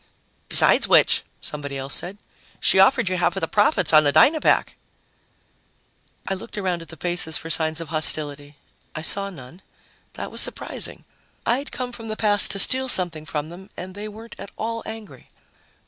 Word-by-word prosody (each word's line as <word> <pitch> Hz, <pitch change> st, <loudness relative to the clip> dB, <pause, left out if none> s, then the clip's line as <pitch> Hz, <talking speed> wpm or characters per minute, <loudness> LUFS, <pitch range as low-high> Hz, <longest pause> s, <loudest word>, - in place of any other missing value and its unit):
"Besides -, -, +5 dB
which," -, -, +4 dB, 0.2 s
somebody 145 Hz, -2 st, -6 dB
else 135 Hz, +1 st, -4 dB
said, 185 Hz, +3 st, -2 dB, 0.4 s
"she -, -, +2 dB
offered 235 Hz, +3 st, +4 dB
you 185 Hz, 0 st, -1 dB
half 175 Hz, -1 st, 0 dB
of -, -, -2 dB
the 165 Hz, -, -1 dB
profits 205 Hz, -, +1 dB
on 155 Hz, 0 st, +7 dB
the 145 Hz, -, +2 dB
Dynapack." 285 Hz, -, +3 dB, 1.5 s
I -, -, -1 dB
looked 195 Hz, +3 st, -9 dB
around 185 Hz, -4 st, -2 dB
at 165 Hz, -, -12 dB
the 165 Hz, -, -9 dB
faces 175 Hz, -2 st, 0 dB
for 165 Hz, -, -7 dB
signs 160 Hz, 0 st, 0 dB
of 165 Hz, -3 st, -7 dB
hostility. 145 Hz, -2 st, 0 dB, 0.4 s
I 155 Hz, -, -5 dB
saw 200 Hz, +4 st, +1 dB
none. 165 Hz, 0 st, -13 dB, 0.5 s
That -, -, -7 dB
was -, -, -1 dB
surprising. -, -, -4 dB, 0.4 s
I'd 255 Hz, +5 st, -1 dB
come 250 Hz, -1 st, -5 dB
from 225 Hz, -2 st, -9 dB
the 215 Hz, -, -4 dB
past 205 Hz, -2 st, +2 dB
to 200 Hz, -, +1 dB
steal 260 Hz, +6 st, +4 dB
something 170 Hz, -9 st, +3 dB
from 150 Hz, 0 st, -4 dB
them 190 Hz, +4 st, -12 dB
and 185 Hz, +1 st, -8 dB
they 205 Hz, +2 st, -7 dB
weren't 220 Hz, +2 st, -11 dB
at -, -, -9 dB
all 230 Hz, +1 st, -4 dB
angry. 220 Hz, -2 st, -10 dB
185 Hz, 180 wpm, -22 LUFS, 155-215 Hz, 1.5 s, on